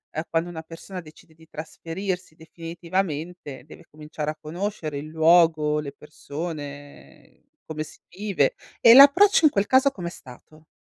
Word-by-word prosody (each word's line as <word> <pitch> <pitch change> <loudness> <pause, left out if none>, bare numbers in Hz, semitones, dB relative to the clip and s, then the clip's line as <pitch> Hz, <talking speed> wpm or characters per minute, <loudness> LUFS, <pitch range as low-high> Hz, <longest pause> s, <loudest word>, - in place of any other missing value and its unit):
uhm, 155 - -1
quando 165 +1 0
una 160 -2 -7
persona 170 +3 -9
decide 160 0 -18
di 160 0 -21
trasferirsi 175 +3 -6
definitivamente 165 -2 -5
deve 160 - -14
cominciare 150 0 -7
a 155 - -12
conoscere 165 -2 -5
il 150 - -8
luogo, 160 -1 +3
le 140 - -7
persone, 145 0 -9 0.2
come 155 -1 -5
si 155 - -14
vive 205 - -1 0.2
e 230 - +8
l'approccio 320 +8 +7
in 305 - +6
quel 200 -3 0
caso 265 +2 +4
com'è 175 -8 -6
stato? 155 +3 -15
165 Hz, 145 wpm, -24 LUFS, 155-185 Hz, 0.2 s, e